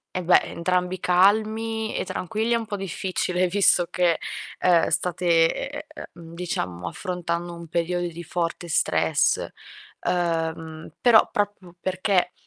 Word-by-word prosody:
eh 185 - -2
beh, 175 - +6
entrambi 180 +1 -1
calmi 220 +5 +2
e - - -1
tranquilli, 215 +6 -2
è - - +4
un 225 -1 -3
po' 205 - -4
difficile 185 -1 -1
visto 180 -1 +3
che, 175 -2 +2 0.4
uhm, 175 -2 +4
state, 175 +2 -1 0.5
e 300 - -7
e 310 - -10
uhm, 165 -1 -12
diciamo 90 - -3
affrontando 175 - -4
un 170 -1 -10
periodo 175 +1 -1
di 170 +1 -9
forte 175 +1 -3
stress. 160 - +2 0.6
Uhm, 165 -2 -2
però 235 -3 +6
proprio 195 -4 -3
perché 185 -1 0
180 Hz, 135 wpm, -24 LUFS, 170-195 Hz, 0.6 s, beh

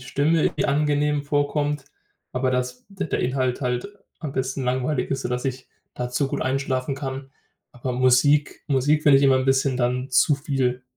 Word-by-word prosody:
Stimme 145 +5 +1
angenehm 150 0 +1
vorkommt. 145 0 -1 0.5
Aber 130 0 0
dass 125 0 -2
d 195 -1 -5
der - - -1
Inhalt 130 0 0
halt 125 +6 -2 0.3
am 155 -5 -5
besten 130 0 -2
langweilig 130 +2 -1
ist, 135 - -1
sodass 125 0 -3
ich 130 -1 -4 0.3
dazu 125 +3 -1
gut - - -3
einschlafen 130 0 -1
kann. 135 -1 -6 0.4
Aber 125 +1 -5
Musik 130 +4 +3
Musik 145 +3 +2
finde 140 -2 +7
ich - - +1
immer 135 -1 +5
'n 130 - 0
bisschen 135 0 +2
dann 125 +1 -1
zu 135 +3 +4
viel. 135 -3 -1
135 Hz, 165 wpm, -23 LUFS, 125-145 Hz, 0.5 s, finde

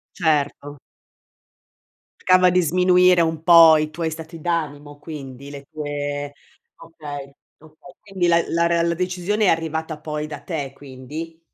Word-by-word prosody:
Certo. 145 -3 -1 1.4
Cercava 185 0 +4
di 180 0 +3
sminuire 180 +1 +4
un 160 -1 -1
po' 165 -2 +8
i 155 0 -2
tuoi 165 +1 -3
stati 160 +1 -9
d'animo 145 -3 -3
quindi, 140 -3 -9
le 140 -1 -10
tue 145 -1 -4 0.4
okay, 145 -4 -9 0.3
okay. 155 +3 -17
Quindi 195 -4 -2
la 170 0 +3
la 170 0 +1
rea 170 0 +1
la 170 0 +1
decisione 185 +4 -1
è - - +3
arrivata 160 -1 -2
poi 150 0 -5
da 155 - -8
te, 145 -6 -5
quindi? 145 +5 -9
160 Hz, 140 wpm, -21 LUFS, 145-170 Hz, 1.4 s, po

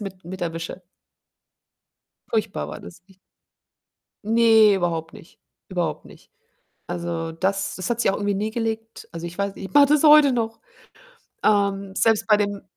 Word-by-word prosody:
mit 190 -3 -8
mit 185 +2 -8
erwische. 165 +2 -5 1.5
Furchtbar 215 -2 -2
war - - -8
das. 170 0 -13
Ich 190 -1 -23 1.1
Ne, 225 -2 +5
überhaupt 165 -3 -2
nicht, - - -16 0.3
überhaupt 170 -5 -3
nicht. - - -17 0.6
Also, 170 -1 -4
das 190 +4 -2
das 185 -1 -5
hat 240 -1 -1
sich - - +2
auch - - -3
irgendwie 205 -1 -1
nie 210 +3 -2
gelegt. 225 0 -5
Also, 165 0 -7
ich 170 - -11
weiß 200 0 -2
nicht, 195 - -8
ich 185 - -19
mache 285 -1 +7
das 300 +1 +3
heute 300 -2 +7
noch. 225 -2 -2 0.8
Ähm, 200 -2 +1
selbst 225 -2 +2
bei 210 - +6
dem 205 -1 -2
200 Hz, 160 wpm, -23 LUFS, 175-225 Hz, 1.5 s, mache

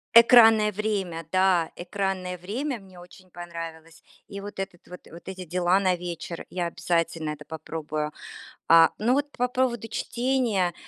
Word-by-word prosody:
Экранное 225 -2 +8
время, 195 -5 -2
да, 185 -3 +3
экранное 185 0 -3
время 235 - -4
мне 190 -3 -15
очень 180 +1 -16
понравилось. 165 -1 -9 0.2
И 200 -1 -7
вот 205 0 -8
этот 195 -3 -6
вот, 180 0 -10
вот 170 - -12
эти 185 -1 -7
дела 180 +2 +2
на 185 -2 +2
вечер, 170 -1 -6
я 175 -2 -1
обязательно 165 -2 -1
это 150 -1 -9
попробую. 155 -1 -4 0.6
А, 165 0 +8
но 235 +4 +2
вот 285 +2 +1
по 250 -3 0
поводу 250 -3 -1
чтения, 235 -7 0
185 Hz, 150 wpm, -26 LUFS, 170-215 Hz, 0.6 s, Экранное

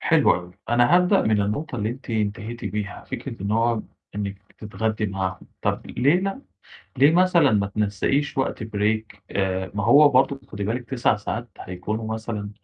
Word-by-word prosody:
حلو - - +4
أوي. 90 0 -6 0.2
أنا 120 +7 +5
هابدأ 180 +2 +4
من 110 -1 +2
النقطة 130 +8 -3
اللي 105 -2 -1
أنتِ 130 +1 -8
انتهيتِ 110 +1 -2
بيها. 100 0 -4
فكرة - - -6
إن 100 - -2
هو 115 0 +2 0.3
إنِّك 100 -1 -4
بتتغدّي 110 0 -3
معاهم، 95 -1 -3 0.2
طَب - - -1
ليه 145 +8 +2
لأ؟ 195 +6 -3 0.6
ليه 140 +3 +7
مثلًا 175 -4 +4
ما 100 -2 +2
تنسَّقيش 105 +9 -1
وقت 130 - -1
break؟ 110 0 -1
آآ، 95 -1 -1
ما 100 -1 -1
هو 145 +6 +7
برضه 135 0 +3
ت 135 - -21
خدي 100 -1 -4
بالِك 120 +4 -3
9 120 -4 +2
ساعات 115 +3 -4
هيكونوا 110 +5 -4
مثلًا 110 -2 -5
110 Hz, 170 wpm, -24 LUFS, 100-130 Hz, 0.6 s, ليه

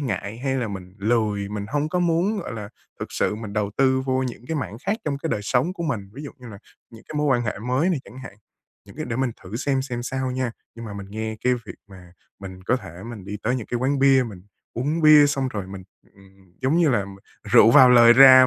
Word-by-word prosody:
ngại 105 -4 -4
hay 135 +1 -1
là 120 -4 -2
mình 95 -2 -8
lười, 105 -2 0
mình 105 -1 -5
hông 145 +3 -1
có 180 +2 -1
muốn, 175 +5 +1
gọi 175 - -6
là, 105 -3 -6 0.3
thực - - -6
sự - - 0
mình 110 -1 -7
đầu 105 -1 -1
tư 130 -1 +3
vô 130 0 0
những 125 -1 -6
cái 160 - -3
mảng 130 -7 -4
khác 205 - +1
trong 140 -2 -2
cái 165 - -4
đời 105 - -1
sống 130 - 0
của 170 - -6
mình, 115 -12 -3
ví 145 - -8
dụ 145 - -7
như 125 -2 -11
là 100 - -10 0.3
những 115 -1 -15
cái - - -8
mối 150 - +1
quan 130 -4 +2
hệ 105 -4 -3
mới 125 - 0
này 165 - 0
chẳng 130 - -13
hạn. 130 -6 -10 0.5
Những - - -16
cái - - -4
để 115 - -4
mình 130 -1 0
thử 95 +4 -7
xem 135 +1 0
xem 125 -3 -5
sao 130 +1 -3
nha. 130 -1 -2 0.2
Nhưng 115 - -9
mà 105 - -7
mình 100 -1 -7
nghe 110 +1 -4
cái 125 0 +3
việc 120 -2 -8
mà 90 -3 -14 0.3
mình 95 -1 -9
có 125 +7 +1
thể 90 -5 -10
mình 105 -5 -9
đi 105 +1 -5
tới 125 +3 0
những 120 - -6
cái 120 - -2
quán 135 +3 0
bia, 135 -1 +5
mình 95 -5 -11 0.3
uống 145 +7 -1
bia, 155 -1 +8
xong 135 -2 -1
rồi 100 -5 -5
mình, 95 0 -9 0.3
ừm, 95 -2 -22
giống 135 +5 +2
như 170 -2 +4
là 105 -7 +1 0.4
rượu 110 - +6
vào 130 0 +8
lời 120 -1 +8
ra 130 0 +9
125 Hz, 260 wpm, -23 LUFS, 105-135 Hz, 0.5 s, ra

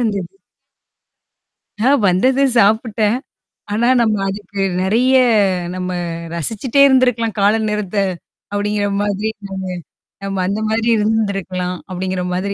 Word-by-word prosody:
இருந்துது. 200 -6 -2 1.5
நான் 265 +2 +3
வந்தது, 255 +10 +2 0.2
சாப்பிட்டேன். 220 +1 +2 0.6
ஆனா 235 +3 +1
நம்ம 220 -2 +2
அதுக்கு 200 0 -7 0.2
நெறையா 250 +7 +3 0.5
"நம்ம 185 0 -4 0.5
ரசிச்சுக்கிட்டே 225 - 0
இருந்திருக்கலாம். 245 -5 +2
காலை 205 +2 +4
நேரத்த" 210 -2 -3 0.6
அப்படிங்கற 205 0 -1
மாதிரி 205 +1 -1 0.2
நானு 195 -1 -6 0.6
"நாம 195 -1 -2
அந்த 200 +3 -2
மாதிரி 225 +1 0
இருந்திருக்கலாம்" 195 -4 -1
அப்படிங்கற 185 0 -3
மாதிரி 200 +2 -2
210 Hz, 105 wpm, -18 LUFS, 190-225 Hz, 1.5 s, காலை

